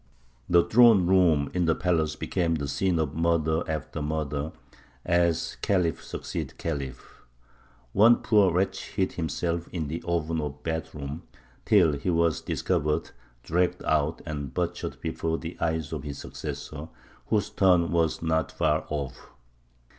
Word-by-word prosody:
The 85 -1 +6
throne 110 +1 +6
room 85 -6 +3
in 90 -1 +1
the 80 - +3
palace 80 -4 0
became 85 -3 0
the 70 -2 -3
scene 85 +6 0
of 75 -3 -1
murder 80 -1 +1
after 75 -1 -4
murder, 75 0 -2 0.5
as 85 -1 +1
khalif 90 -5 +1
succeeded - - -5
khalif. 70 -6 -5 0.7
One 115 +4 +7
poor 105 -5 +4
wretch 95 +2 -1
hid 95 - 0
himself 85 +1 -2
in 80 -5 -4
the 80 +2 -4
oven 80 -1 0
of 75 -2 -3
the - - -23
bath 80 -1 -4
room, 70 +2 -6 0.4
till 90 -7 +5
he 70 +6 -2
was 85 -2 +2
discovered, 75 +1 -1 0.3
dragged 90 +2 0
out, 75 0 0
and 70 -4 -4
butchered 85 +4 -3
before 80 0 -2
the 85 +1 -7
eyes 80 -1 -1
of 75 - -3
his 70 -1 -6
successor, 75 +1 -7 0.4
whose 105 -2 0
turn 90 -3 +3
was 85 -1 +1
not 80 0 0
far 80 -1 0
off. 70 -4 -5
80 Hz, 145 wpm, -27 LUFS, 75-85 Hz, 0.7 s, One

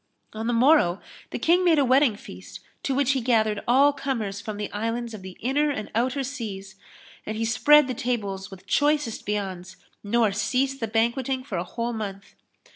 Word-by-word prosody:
On 220 +1 -4
the 240 - +1
morrow, 230 - +4 0.3
the - - -4
King 350 +3 +3
made 340 -3 +4
a 280 - +4
wedding 260 -2 +4
feast 90 - -11 0.2
to 270 - -1
which 275 -1 +2
he 270 -2 0
gathered 220 -3 +1
all 275 +4 +5
comers 230 -8 -3
from 210 0 -6
the 210 0 -4
Islands 230 +2 -3
of 215 - -8
the 185 -1 -10
Inner 285 +5 +1
and 220 -7 -4
Outer 255 +4 0
Seas, 205 -8 -6 0.5
and 215 0 -5
he 225 - -1
spread 295 +6 +5
the 255 - -2
tables 205 -6 -3
with 195 -1 -13
choicest 290 -2 0
viands 190 -3 -4 0.3
nor 220 0 +2
ceased 265 +6 0
the 225 - -2
banquetting 240 +4 0
for 205 -10 -4
a - - -2
whole 235 +5 -4
month. 200 -3 -6
230 Hz, 190 wpm, -25 LUFS, 205-270 Hz, 0.5 s, all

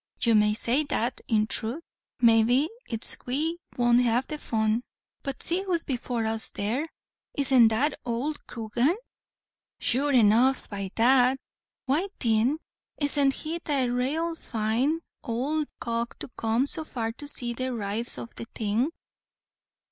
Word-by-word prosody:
"You 230 - +3
may 210 0 +3
say 250 +7 +3
that 255 -4 -2
in 215 -2 +1
throth 235 +8 +1 0.4
maybe 235 +4 +3 0.2
it's 225 -2 +3
we 315 +7 -2 0.2
won't 240 0 +3
have 245 +1 0
the 305 -1 -6
fun 220 -1 -1 0.4
but 275 -1 -5
see 350 +3 +1
who's 355 -4 +3
before 245 -3 -3
us 220 0 +4
there. 240 +10 -3 0.5
Isn't 265 -4 +6
it - - +4
that 255 +8 -1
owld 250 +6 -4
Coogan?" 240 - -1 0.8
"Sure 280 +4 +4
enough 245 +2 +3
by 200 -2 -5
dad." 250 +2 +3 0.5
"Why 295 +9 0
thin 230 +5 +2 0.4
isn't 285 -1 +4
he 325 +2 -3
the 270 -5 -1
rale 295 +7 -2
fine 245 +4 -2 0.3
ould 290 +6 -2
cock 235 0 -4
to - - -8
come 230 +2 -1
so 315 +2 +2
far 230 -7 -4
to 290 +5 -7
see 245 -4 +4
the 255 +2 -4
rights 225 +1 0
o' - - -5
the 230 - -4
thing?" 225 +4 -2
245 Hz, 145 wpm, -26 LUFS, 225-285 Hz, 0.8 s, Isn't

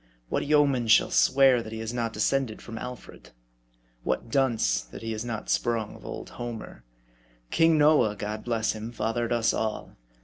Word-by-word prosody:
What - - -1
yeoman 140 -5 +3
shall 110 - +5
swear 130 - +5
that 110 - -9
he 110 - -6
is 110 +1 -4
not 115 -2 -1
descended 115 +1 0
from 115 -1 -8
Alfred? 125 -3 -9 0.7
what 115 - -2
dunce, 115 - +2
that - - -11
he 115 0 -3
is 110 +1 -4
not 115 -3 -5
sprung 115 -3 0
of - - -14
old - - -7
Homer? 115 - -7 0.7
King 165 -1 +4
Noah, 150 -8 +4
God 105 +1 -5
bless 115 -2 0
him! 110 +1 -6
fathered 115 +1 -2
us 115 -1 +2
all. 110 -1 -3
115 Hz, 170 wpm, -27 LUFS, 110-125 Hz, 0.7 s, shall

